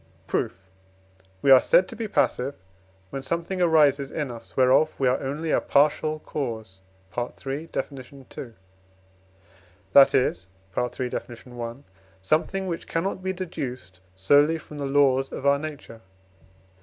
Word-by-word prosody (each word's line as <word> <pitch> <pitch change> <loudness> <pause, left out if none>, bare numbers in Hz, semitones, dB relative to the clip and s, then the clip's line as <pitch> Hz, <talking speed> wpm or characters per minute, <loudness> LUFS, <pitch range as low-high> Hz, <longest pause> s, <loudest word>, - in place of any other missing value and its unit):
Proof. - - -1 0.9
We 135 - +5
are 130 -1 +9
said 185 - +4
to - - -9
be 225 - -4
passive, 140 -8 0 0.6
when 135 - -4
something 170 +5 -2
arises 150 -5 +4
in 145 -4 -3
us, 115 -1 -12
whereof 130 +4 +3
we 135 - +2
are 125 - +2
only 150 +4 -3
a - - +3
partial 150 +2 +2
cause 115 -11 -5 0.4
(III. 135 +5 -4
Def. - - -3 0.2
ii.), 135 -3 -10 1.4
that 140 -1 +8
is 95 -8 +1 0.3
(III. 125 +1 -2
Def. 120 0 -7
i.), 120 -1 -5 0.4
something 160 - 0
which 170 -3 -4
cannot 185 +3 -2
be 190 0 -1
deduced 130 - -6 0.2
solely 145 +12 +4
from 150 -2 -10
the 140 - -2
laws 135 -1 +3
of 135 - -6
our 140 0 +4
nature. 145 -7 -8
140 Hz, 140 wpm, -25 LUFS, 125-155 Hz, 1.4 s, are